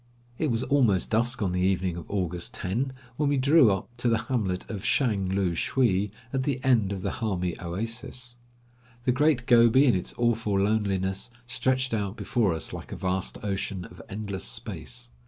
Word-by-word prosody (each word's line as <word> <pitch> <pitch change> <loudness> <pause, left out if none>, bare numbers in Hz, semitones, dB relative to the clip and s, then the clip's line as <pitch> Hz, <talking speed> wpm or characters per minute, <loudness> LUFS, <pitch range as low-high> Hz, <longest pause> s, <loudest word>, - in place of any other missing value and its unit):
It 155 - +1
was 115 0 0
already 120 -10 +3
dusk 120 +1 +1
on 95 - 0
the 90 0 0
evening 95 -2 +1
of 85 -2 -8
August 90 -3 -1
10 120 +9 -2 0.3
when 150 -1 +1
we 145 - +2
drew 140 -1 +6
up 95 -1 -2
to 120 0 +1
the 115 - +3
hamlet 110 -6 -2
of 100 -4 -6
Shang 105 -8 +1
loo 95 -2 +1
shwee 105 +2 +1 0.2
at 135 - +1
the 135 -1 -1
end 115 -7 +3
of 95 -2 -4
the - - -1
Hami 90 -6 -2
oasis. 115 +7 -4 0.7
The 125 - +3
Great 140 -1 +2
Gobi, 120 +3 +6
in 125 - +5
its 90 - -3
awful 115 -4 +1
loneliness, 100 -1 0 0.2
stretched 130 +2 0
out 105 -1 -2
before 105 -9 +1
us, 80 - -2
like - - -8
a - - -4
vast 95 0 -2
ocean 95 -2 -2
of 90 -2 -12
endless 100 -5 -4
space. - - -4
105 Hz, 180 wpm, -27 LUFS, 95-125 Hz, 0.7 s, drew